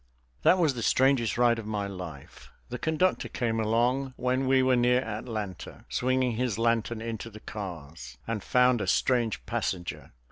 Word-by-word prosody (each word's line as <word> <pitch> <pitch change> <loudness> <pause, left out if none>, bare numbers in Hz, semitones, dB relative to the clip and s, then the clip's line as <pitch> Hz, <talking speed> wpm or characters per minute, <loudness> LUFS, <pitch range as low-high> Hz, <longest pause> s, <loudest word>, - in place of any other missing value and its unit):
That 185 - +5
was 160 -6 +3
the 120 - -5
strangest 130 -2 +2
ride 120 -1 +3
of 110 - -7
my 105 -2 -2
life. 90 -8 -9 0.2
The 125 - -5
conductor 170 +3 +1
came 115 -2 -1
along 125 +4 +1
when 130 +1 0
we 130 0 +4
were 130 0 +4
near 125 +1 +3
Atlanta, 110 -5 -6
swinging 130 0 +1
his 125 -4 -1
lantern 115 -1 0
into 115 0 -5
the 110 -1 -11
cars, 85 - -8
and 110 -3 -3
found 125 -2 +3
a - - -2
strange 120 -4 +1
passenger. 90 -2 -3
115 Hz, 165 wpm, -28 LUFS, 105-130 Hz, 0.2 s, That